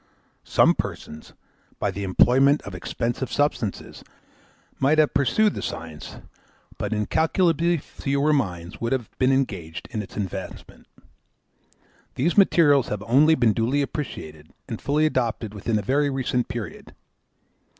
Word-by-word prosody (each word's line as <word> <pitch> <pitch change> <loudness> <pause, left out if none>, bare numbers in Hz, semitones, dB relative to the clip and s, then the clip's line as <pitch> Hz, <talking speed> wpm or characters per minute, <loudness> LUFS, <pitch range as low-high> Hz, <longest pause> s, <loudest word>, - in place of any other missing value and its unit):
Some - - +4
persons, 75 0 -6 0.4
by 100 - -1
the 100 +1 -5
employment 130 +9 +4
of 100 - -8
expensive 120 +7 -3
substances, 145 -8 -2 0.8
might 140 +4 +3
have 155 -1 +4
successfully 140 - +2
pursued 210 - +3
the - - -5
science; 80 -2 -7 0.6
but - - -3
incalculably 165 - +1
fewer 140 +1 -1
minds 90 - -2
would 115 +2 0
have 125 -5 -4
been 130 +1 +3
engaged 90 -12 -2
in 110 -4 -2
its 100 - -11
advancement. 95 -2 -6 1.3
These 160 +7 0
materials 150 - +5
have 105 -1 -4
only 145 +8 +4
been 120 -6 +3
duly 125 +6 +1
appreciated 80 - -6 0.2
and - - -6
fully 150 +2 +1
adopted 115 -7 -1
within 110 +2 -1
a 105 - -2
very 145 +6 +1
recent 130 -2 -1
period. 115 -3 -7
125 Hz, 135 wpm, -24 LUFS, 105-145 Hz, 1.3 s, materials